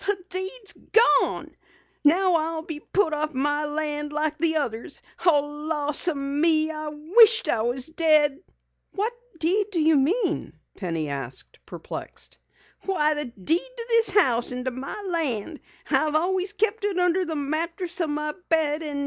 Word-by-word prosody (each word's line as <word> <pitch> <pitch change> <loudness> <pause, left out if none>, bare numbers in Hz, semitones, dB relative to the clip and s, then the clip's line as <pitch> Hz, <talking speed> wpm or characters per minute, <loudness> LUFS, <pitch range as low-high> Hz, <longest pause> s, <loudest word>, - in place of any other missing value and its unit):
"The 410 -1 +1
deed's 380 +4 -2 0.5
gone! - - -5 0.5
Now 360 +5 +3
I'll 325 0 -1
be 320 -2 -7
put 335 0 -1
off 300 -1 -3
my 290 +3 0
land 295 0 -3
like 305 0 -1
the 320 0 +3
others. 235 -7 -3 0.2
Oh, 315 -5 +4 0.3
lawseeme, 290 -1 0 0.3
I 305 -1 -6
wisht 430 +10 +5
I 225 - +1
was 245 +3 +1
dead!" 310 -3 +3 0.5
"What 425 +4 -2 0.2
deed 375 +6 +1
do 350 - 0
you 315 -1 +3
mean?" 355 - -1 0.2
Penny 165 -5 -4
asked, 135 -2 -7
perplexed. - - -10 0.4
"Why, 310 -6 +1
the 295 0 0
deed 245 - 0 0.2
to 465 - 0
this 460 -1 +4
house 250 - +3
and 250 +1 -5
my 260 +9 -7
land! 300 -4 -1 0.3
I've 305 -1 +2
always 370 +4 0
kept 430 +1 -1
it 405 -3 -1
under 360 +1 +2
the 325 -3 -1
mattress 335 +5 -2
o' 330 - 0
my 300 0 -3 0.2
bed. 315 -1 +2
310 Hz, 150 wpm, -24 LUFS, 290-360 Hz, 0.5 s, wisht